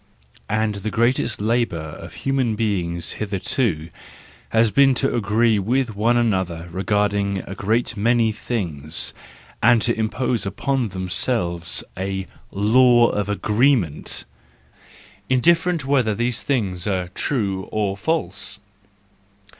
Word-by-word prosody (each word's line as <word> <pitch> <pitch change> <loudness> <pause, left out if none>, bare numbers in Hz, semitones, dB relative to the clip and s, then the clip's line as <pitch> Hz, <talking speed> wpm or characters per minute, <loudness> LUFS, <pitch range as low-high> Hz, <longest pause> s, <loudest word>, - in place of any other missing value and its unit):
And 110 0 +1
the 110 - -2
greatest 120 0 +1
labour 115 -3 +1
of 80 -1 -8
human 130 -5 +1
be¬ 105 -4 +1
ings 85 0 -4
hitherto 95 - -1 0.6
has 115 -1 +3
been 135 +1 +5
to - - 0
agree 110 0 +2
with 120 +2 0
one 115 +4 +2
another 95 -7 0
regarding 100 +1 0
a - - -7
great 110 +4 0
many 115 +1 +2
things, 85 - -3 0.5
and 120 +1 +5
to 115 - +2
impose 115 0 -1
upon 130 +6 -1
themselves 90 -1 -1
a 95 0 -3 0.2
law 120 +4 +5
of 105 -1 -2
agreement 105 - +1 1.0
—indifferent 165 +4 +3
whether 130 -6 +2
these 120 +2 -1
things 100 -10 -1
are 90 -3 -1
true 100 -3 -2
or 105 -2 0
false. 100 - -2
110 Hz, 115 wpm, -22 LUFS, 95-120 Hz, 1.0 s, been